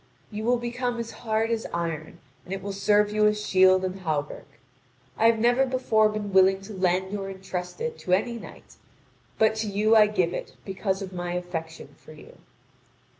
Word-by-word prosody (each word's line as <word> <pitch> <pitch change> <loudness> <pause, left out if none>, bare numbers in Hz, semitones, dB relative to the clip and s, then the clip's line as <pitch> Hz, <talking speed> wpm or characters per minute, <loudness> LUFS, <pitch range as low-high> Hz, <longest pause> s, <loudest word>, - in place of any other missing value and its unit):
You 215 +1 -5
will 245 +1 +3
become 240 +1 -3
as 230 -1 -5
hard 225 0 -1
as 225 -1 -2
iron, 165 -2 -4 0.3
and 180 - -13
it 195 -1 -4
will 200 0 -4
serve 205 +1 +2
you 210 0 +3
as 210 0 +1
shield 185 -1 +4
and 185 +1 -4
hauberk. 155 -5 -3 0.7
I 225 - +3
have 230 0 +4
never 240 +4 +3
before 250 -5 +2
been 210 -2 -4
willing 190 0 +5
to 205 +2 -10
lend 190 +1 0
or 195 -1 -4
entrust 190 -2 -6
it 470 0 -4
to 180 - -1
any 235 +5 0
knight, - - -13 0.6
but 220 0 +4
to 220 0 -2
you 210 +2 +2
I 215 -1 +7
give 185 -5 0
it - - -6
because 195 0 -2
of 190 -1 -8
my 175 -1 -4
affection 165 -2 -6
for 155 - -13
you." 150 - -15
200 Hz, 190 wpm, -26 LUFS, 185-220 Hz, 0.7 s, I